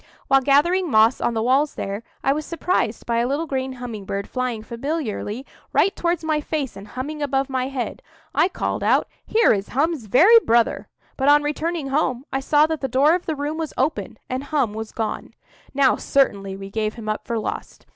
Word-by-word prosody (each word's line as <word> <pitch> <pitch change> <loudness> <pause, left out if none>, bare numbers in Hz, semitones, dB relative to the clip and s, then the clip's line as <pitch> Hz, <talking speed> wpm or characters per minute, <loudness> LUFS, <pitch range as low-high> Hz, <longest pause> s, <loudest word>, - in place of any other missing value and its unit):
While 270 0 +5
gathering 325 +7 +3
moss 220 0 +4
on 235 - 0
the 220 - 0
walls 270 +5 +2
there, 200 +2 -4 0.2
I 270 - +3
was 305 +2 -3
surprised 315 -8 -1
by 235 -1 0
a 240 - +1
little 285 +5 -1
green 265 -3 -3
humming 240 -5 -7
bird 200 +1 -3
flying 250 -4 -3
familiarly 240 -2 -4 0.3
right 390 - +3
towards 340 -1 -1
my 310 -1 0
face 295 -6 -3
and 195 +1 -10
humming 290 +7 -5
above 275 -1 0
my 255 -1 0
head. 265 -3 -4 0.3
I - - +4
called 375 - -3
out, - - +3 0.2
"Here 455 +1 +4
is 200 -1 -2
Hum's 295 -1 0
very 365 - +7
brother." 235 - +1 0.3
But, 270 +1 +2
on 295 0 +6
returning 310 0 -2
home, 270 -2 0
I 270 - +1
saw 295 +2 +4
that 320 -1 -3
the 270 - -1
door 275 +5 +4
of 360 0 -2
the 320 - -1
room 295 +2 -3
was 320 -2 -4
open, 250 -7 -1
and 260 +2 -3
Hum 280 -8 0
was 220 0 -6
gone. 220 -2 -4 0.4
Now 275 -1 +3
certainly 200 -8 +1
we 195 0 -9
gave 215 0 -2
him 225 -2 -8
up 215 0 -3
for 235 - -1
lost. 220 - -5
270 Hz, 205 wpm, -22 LUFS, 230-300 Hz, 0.4 s, very